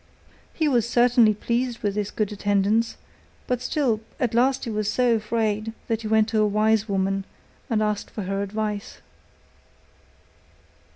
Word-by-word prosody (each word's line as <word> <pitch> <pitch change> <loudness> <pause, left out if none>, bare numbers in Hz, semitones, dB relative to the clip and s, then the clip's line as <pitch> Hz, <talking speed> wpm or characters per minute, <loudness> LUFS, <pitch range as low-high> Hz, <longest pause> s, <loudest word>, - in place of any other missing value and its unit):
He 315 - 0
was 240 -5 +2
certainly 240 -3 +4
pleased 240 +2 -2
with 205 -1 0
this 205 0 -2
good 215 -2 -2
attendance, 205 +2 +1 0.5
but 250 -1 -1
still 250 -5 0 0.2
at 245 -3 0
last 260 +3 +2
he 235 - -3
was 215 -1 -1
so 250 -2 +3
afraid 220 0 -1
that 225 -1 -1
he 220 - -5
went 220 0 +3
to 220 -2 +2
a 210 - +3
wise 215 +1 +2
woman 195 0 0 0.5
and 215 -3 +1
asked 210 -1 -2
for 210 - -6
her 195 +1 -2
advice. 210 0 -4
215 Hz, 155 wpm, -24 LUFS, 210-235 Hz, 0.5 s, certainly